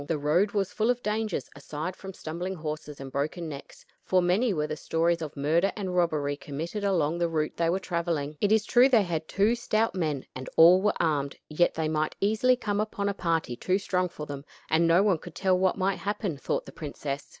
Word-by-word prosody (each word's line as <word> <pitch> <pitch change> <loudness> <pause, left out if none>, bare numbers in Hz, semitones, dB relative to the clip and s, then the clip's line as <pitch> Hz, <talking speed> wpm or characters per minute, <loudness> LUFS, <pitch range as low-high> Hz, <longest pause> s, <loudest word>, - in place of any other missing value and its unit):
The 165 - 0
road 160 +8 +2
was 200 -2 0
full 220 +2 +1
of 245 0 0
dangers 210 - -1
aside 150 +5 -5
from 190 0 -8
stumbling 175 +2 -5
horses 155 -2 -6
and 135 -1 -7
broken 155 +5 -2
necks, 140 -3 -10 0.2
for 185 - +2
many 185 +7 +2
were 150 -5 0
the 155 - -4
stories 165 +2 0
of 155 -2 -6
murder 160 +7 +2
and 190 -4 -3
robbery 155 -5 +1
committed 160 +8 -5
along 170 -4 +1
the 170 -1 +1
route 155 -2 -1
they 165 -1 +1
were 180 - +2
traveling. 170 -5 -2
It 205 - +2
is 220 -1 +4
true 250 +3 +5
they 230 -5 +5
had 160 -3 -3
two 205 +4 +2
stout 225 -1 0
men, 155 -7 -2
and 130 0 -7
all 175 +3 +8
were 210 +1 +2
armed, 145 -4 0
yet 165 +3 +2
they 160 -1 0
might 155 0 -1
easily 220 +5 +3
come 205 -5 -2
upon 205 -1 -1
a - - -1
party 165 -9 -1
too 185 +9 0
strong 185 -2 0
for 150 -3 -7
them; 140 -1 -7 0.3
and 165 +1 +4
no 170 +4 +5
one 195 -6 +2
could 175 -1 -11
tell 190 -1 +2
what 185 -1 +2
might 190 0 0
happen, 205 -4 -2
thought 140 - -2
the - - -10
princess. 145 -2 -5
170 Hz, 220 wpm, -27 LUFS, 155-200 Hz, 0.3 s, all